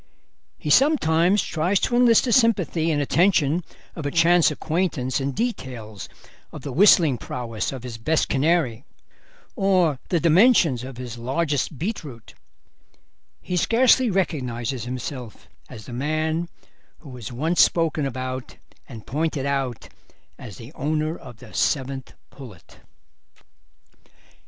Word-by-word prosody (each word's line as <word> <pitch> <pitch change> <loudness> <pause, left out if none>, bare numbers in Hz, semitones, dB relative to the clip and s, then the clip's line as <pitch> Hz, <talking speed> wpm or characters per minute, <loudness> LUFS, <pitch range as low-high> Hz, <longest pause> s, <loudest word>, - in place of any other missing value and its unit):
He 150 - -3
sometimes 190 - +3
tries 180 +5 0
to 240 - 0
enlist 240 -1 +5
the 245 - -1
sympathy 185 - +2
and 150 -2 +1
attention 165 +1 +2 0.3
of 160 - -6
a 145 - -1
chance 170 +2 +4
acquaintance 150 -4 -2
in 135 +1 -1
details 125 - -5 0.4
of - - -10
the 140 - -5
whistling 160 - +5
prowess 115 -3 -4
of 130 -3 -8
his 120 -2 -7
best 155 +7 +1
canary 140 -5 +1 0.7
or 185 - +2
the 175 - +1
dimensions 170 - +4
of 130 -1 -8
his 120 -2 -7
largest 145 +3 -1
beetroot; 150 - -6 1.1
he 180 - -3
scarcely 245 +5 +4
recognises 130 - -2
himself 125 -2 -7 0.2
as 105 - -10
the 120 - -9
man 155 +5 -1 0.5
who 150 - -12
was 125 -2 -8
once 160 +8 +1
spoken 165 -3 +2
about 130 -1 -5 0.3
and 115 -5 -10
pointed 150 0 -2
out 135 -4 -2 0.5
as 110 -8 -11
the 120 +6 -12
owner 155 +3 -2
of 125 -8 -12
the 120 -3 -14
Seventh 135 -2 -2 0.2
Pullet. 115 - -14
150 Hz, 125 wpm, -23 LUFS, 125-170 Hz, 1.1 s, enlist